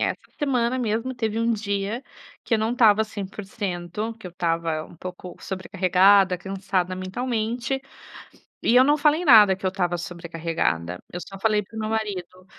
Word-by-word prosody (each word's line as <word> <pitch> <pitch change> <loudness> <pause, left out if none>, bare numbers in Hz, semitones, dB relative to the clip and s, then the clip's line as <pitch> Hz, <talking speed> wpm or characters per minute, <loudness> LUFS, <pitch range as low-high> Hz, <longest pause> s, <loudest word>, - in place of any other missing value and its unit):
Essa - - -28
semana 255 -4 +1
mesmo 230 +2 -1
teve 225 -2 -1
um 230 +1 +2
dia 205 +1 -2 0.4
que - - -1
eu 225 - +3
não 220 +1 0
estava 220 -4 +5
100%, 200 -1 -5
que 190 - -8
eu - - -11
estava 165 -2 -1
um - - -15
pouco 180 +1 -8
sobrecarregada, 190 0 +3
cansada 185 -1 -2
mentalmente. 235 +6 -2 0.8
E 235 - +3
eu 255 - +8
não 290 +2 +4
falei 305 +3 +2
nada 210 - +8
que 190 - -8
eu - - +3
estava 180 -2 -1
sobrecarregada, 165 - -3
eu 175 - -5
só 195 - -9
falei 215 0 +2
para 220 - -17
o - - -4
meu 215 0 -2
marido: 190 -4 -4
200 Hz, 165 wpm, -24 LUFS, 180-225 Hz, 0.8 s, eu